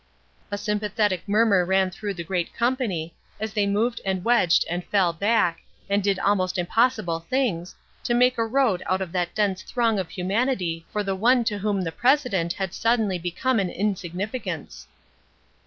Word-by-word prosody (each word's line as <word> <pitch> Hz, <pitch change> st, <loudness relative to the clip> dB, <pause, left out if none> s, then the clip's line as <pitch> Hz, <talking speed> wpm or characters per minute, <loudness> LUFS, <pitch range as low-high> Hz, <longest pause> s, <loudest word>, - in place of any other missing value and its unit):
'" -, -, -37 dB
A 205 Hz, -, -1 dB
sympathetic 210 Hz, -2 st, -1 dB
murmur 205 Hz, -3 st, +4 dB
ran 190 Hz, +1 st, +2 dB
through 200 Hz, +1 st, -5 dB
the 170 Hz, -, -5 dB
great 175 Hz, 0 st, -3 dB
company, 230 Hz, -10 st, -1 dB, 0.3 s
as 215 Hz, -1 st, -4 dB
they 205 Hz, -2 st, +1 dB
moved 230 Hz, +4 st, 0 dB
and 190 Hz, -1 st, -2 dB
wedged 205 Hz, -8 st, +4 dB
and 175 Hz, +1 st, -3 dB
fell 185 Hz, -4 st, +2 dB
back, 200 Hz, -2 st, +1 dB, 0.3 s
and 200 Hz, +1 st, +1 dB
did 200 Hz, -1 st, +1 dB
almost 185 Hz, -2 st, +1 dB
impossible 180 Hz, -2 st, +1 dB
things, 180 Hz, -3 st, -2 dB, 0.3 s
to 240 Hz, -, +1 dB
make 250 Hz, 0 st, +3 dB
a 225 Hz, -, +1 dB
road 230 Hz, -7 st, +2 dB
out 185 Hz, +1 st, 0 dB
of 185 Hz, -3 st, -4 dB
that 175 Hz, -1 st, -2 dB
dense 200 Hz, -3 st, 0 dB
throng 230 Hz, -4 st, 0 dB
of 185 Hz, -, -3 dB
humanity 185 Hz, -4 st, -1 dB
for 210 Hz, -, -1 dB
the 195 Hz, -1 st, -1 dB
one 240 Hz, +5 st, +3 dB
to 210 Hz, -2 st, -2 dB
whom 200 Hz, -1 st, 0 dB
the 165 Hz, -, -3 dB
president 240 Hz, -, +1 dB
had 190 Hz, -2 st, -4 dB
suddenly 220 Hz, -5 st, +1 dB
become 180 Hz, +9 st, 0 dB
an 190 Hz, -2 st, 0 dB
insignificance. 200 Hz, +4 st, -4 dB
200 Hz, 170 wpm, -24 LUFS, 180-230 Hz, 0.3 s, murmur